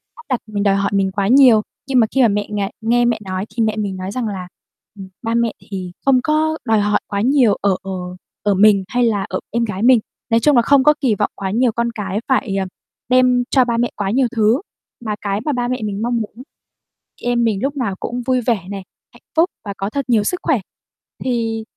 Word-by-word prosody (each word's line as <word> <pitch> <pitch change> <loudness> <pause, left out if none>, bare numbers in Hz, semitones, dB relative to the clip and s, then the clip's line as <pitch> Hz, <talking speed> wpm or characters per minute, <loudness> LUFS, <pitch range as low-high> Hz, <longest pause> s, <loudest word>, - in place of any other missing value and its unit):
áp 310 - -14
đặt 255 -3 +1
mình, 205 -1 -2
đòi 200 -1 +3
hỏi 200 0 0
mình 195 -1 +1
quá 195 0 -1
nhiều, 250 -2 +6 0.3
nhưng 265 -2 +3
mà 225 - +4
khi 270 - +4
mà 240 - +6
mẹ 205 -1 -1
ng 210 - -3 0.2
nghe 240 +2 +2
mẹ 235 -2 +1
nói 185 +1 -3
thì 230 - +1
mẹ 215 -1 0
mình 200 -3 -2
nói 185 +1 -5
rằng 240 +1 -2
là, 190 -3 -5 0.5
ừm, 190 - -8
ba 225 -1 -2
mẹ 235 -1 +1 0.2
thì 185 -3 -5
không 270 -2 +5
có 315 +1 +1
đòi 220 -3 +3
hỏi 205 0 +2
quá 200 0 -2
nhiều 250 -2 +4
ở 200 -1 +2
ở 195 - -6 0.5
ở 205 - +2
mình 200 0 +5
hay 245 0 0
là 215 -4 +1
ở - - -2
em 235 0 0
gái 205 -1 -4
mình. 250 -1 +6 0.3
Nói 230 -1 +4
chung 295 +4 +3
là 240 - +6
không 275 +2 +4
có 300 - +6
kỳ 235 -6 +2
vọng - - 0
quá 190 -1 -3
nhiều 240 +2 +2
con 235 +1 -1
cái 205 -1 -3
phải, 255 -6 +1
ờ, 190 - -1 0.4
đem 250 -1 +4
cho 260 -3 +4
ba 235 -1 -1
mẹ 240 +1 0
quá 195 -2 -2
nhiều 255 +2 +2
thứ, 225 +4 +3 0.4
mà 210 -1 -1
cái 200 -1 -1
mà 300 - +1
ba 245 -1 -1
mẹ 250 0 -2
mình 205 -1 -3
mong 240 +1 0
muốn 225 +2 -6 0.8
em 240 0 +1
mình 220 -4 +1
lúc 280 +1 -1
nào 225 -8 -1
cũng 245 +1 -4
vui 255 -1 +1
vẻ 220 -6 -1
nè, 200 -1 -5 0.3
hạnh - - -18
phúc 330 +3 +4 0.2
và 200 - -4
có 195 +1 -2
thật 280 +4 -3
nhiều 225 -4 +3
sức 360 - -1
khỏe. 305 -8 +2 0.7
Thì 225 -3 -1
225 Hz, 245 wpm, -19 LUFS, 200-250 Hz, 0.8 s, nhiều